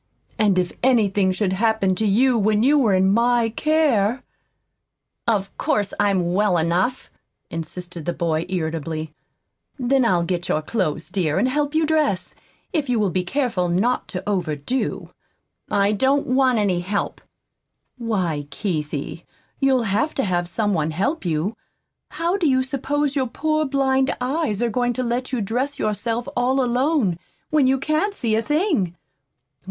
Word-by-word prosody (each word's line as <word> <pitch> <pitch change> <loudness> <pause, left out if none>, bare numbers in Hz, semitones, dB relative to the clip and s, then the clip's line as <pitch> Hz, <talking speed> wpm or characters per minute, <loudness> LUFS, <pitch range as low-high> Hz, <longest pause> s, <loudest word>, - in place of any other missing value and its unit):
And 205 -4 +3
if 180 -1 +1
anything 205 -6 +3
should 185 0 0
happen 220 -1 +2
to 215 +4 0
you 245 +6 +3
when 215 0 +2
you 285 +4 +4
were 235 -9 +3
in 190 +1 +3
MY 235 0 +3
care 265 -4 +1 0.5
" - - -57
"Of 195 0 -9
course 205 -1 0
I'm 190 -4 +2
well 200 -2 +2
enough," 175 +10 0 0.4
insisted 170 0 -6
the 175 - 0
boy 165 -1 -1
irritably. 160 -3 -3 0.6
"Then 265 0 +2
I'll 180 -7 +2
get 175 0 -3
your 155 - 0
clothes, 175 -5 -2
dear, 175 -5 0
and 225 +7 +2
help 290 +3 -1
you 320 0 +3
dress, 300 -12 0 0.4
if 295 -5 -1
you 240 -2 +2
will 205 -3 +1
be 185 +1 0
careful 200 -5 -1
not 210 +9 +1
to 185 - -6
overdo." 180 - -2 0.6
"I 200 0 +2
don't 265 +7 +2
want 255 -1 +3
any 195 -4 +1
help." 200 +3 -3 0.8
"Why, 180 -11 -1
Keithie, 155 -3 -4 0.4
you'll 265 -3 +3
HAVE 225 +9 0
to 270 - 0
have 175 -3 -1
some 205 +2 0
one 155 -3 0
help 200 - -1
you. 170 +6 -1 0.5
How 340 +3 -1
do 340 -6 +2
you 260 -1 +3
suppose 280 +2 -1
your 265 -2 +1
poor 310 +5 0
blind 270 -1 +1
eyes 250 -4 -1
are 235 - 0
going 245 +2 0
to 255 - -2
let 245 +2 -2
you 250 -4 -1
dress 250 +8 -2
yourself 225 +3 -2
all 255 +2 +2
alone, 250 - +1 0.3
when 300 -4 +4
you 265 +1 +3
can't 310 +9 0
see 230 - -1
a 220 - +2
thing? 295 - 0
220 Hz, 160 wpm, -22 LUFS, 185-265 Hz, 0.8 s, you